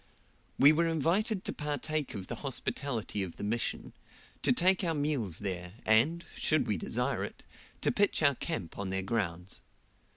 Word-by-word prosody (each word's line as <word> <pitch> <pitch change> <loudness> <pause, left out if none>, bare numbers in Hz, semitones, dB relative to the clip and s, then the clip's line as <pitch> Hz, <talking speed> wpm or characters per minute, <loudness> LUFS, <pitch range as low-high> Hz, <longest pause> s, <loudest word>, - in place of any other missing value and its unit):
We 140 +2 +8
were 165 +2 +2
invited 185 - +1
to - - -1
partake 150 -1 -2
of 95 -2 -5
the - - -5
hospitality 125 -5 -2
of 90 -3 -4
the - - -7
Mission, 115 +3 -2 0.5
to - - +3
take 185 +8 +4
our 165 -2 +1
meals 145 - +1
there, 90 -3 -4
and, 145 +11 +3
should 155 -1 +2
we 105 - 0
desire 85 - -1
it, - - -7 0.4
to - - +2
pitch 200 -5 +2
our 140 -2 +6
camp 125 - -4
on 100 -2 -2
their 95 0 -1
grounds. 95 -4 -2
135 Hz, 165 wpm, -31 LUFS, 100-160 Hz, 0.5 s, We